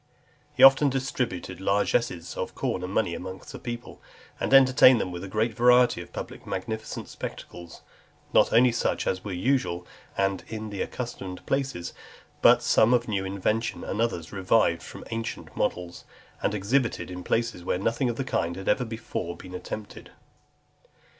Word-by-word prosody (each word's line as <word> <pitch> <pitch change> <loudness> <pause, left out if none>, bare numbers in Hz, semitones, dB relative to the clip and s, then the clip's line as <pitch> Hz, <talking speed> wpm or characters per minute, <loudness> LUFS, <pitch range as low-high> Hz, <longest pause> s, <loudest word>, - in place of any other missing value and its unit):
XXI. - - -30
He - - +4
often 135 +2 +8
distributed 125 -9 -3
largesses 100 -3 0
of - - -4
corn 90 - -2
and 90 - -4
money 100 -4 +1
among 95 +2 -7
the - - -8
people, 120 0 -7 0.4
and - - -2
entertained 130 -2 +7
them 90 - -2
with 90 +1 -6
a - - -5
great 110 +4 0
variety 125 -2 +4
of 85 - -12
public - - -8
magnificent 110 +4 -4
spectacles, 85 -1 -9 0.5
not - - +5
only 120 +2 +5
such 120 - -1
as 95 - -1
were 105 - -5
usual, 90 -3 0 0.3
and 95 -1 0
in 110 -1 -6
the 100 - -4
accustomed 95 -7 -5
places, 135 -11 -2 0.5
but - - +6
some 115 +3 +5
of 120 -1 0
new 100 -3 -1
invention, 100 +4 -1
and 110 - -2
others 90 -8 -2
revived 95 -3 +2
from - - -10
ancient 115 0 -5
models, 90 -1 -2 0.4
and 105 - 0
exhibited 115 +1 0
in 90 0 -6
places 115 -5 -1
where 90 - 0
nothing 115 +6 0
of 120 - -2
the 135 - -2
kind 85 -9 -1
had 95 +1 -7
been - - +4
ever 125 - 0
before 110 -6 -5 0.2
attempted. 105 +3 -7
110 Hz, 165 wpm, -26 LUFS, 90-120 Hz, 0.5 s, often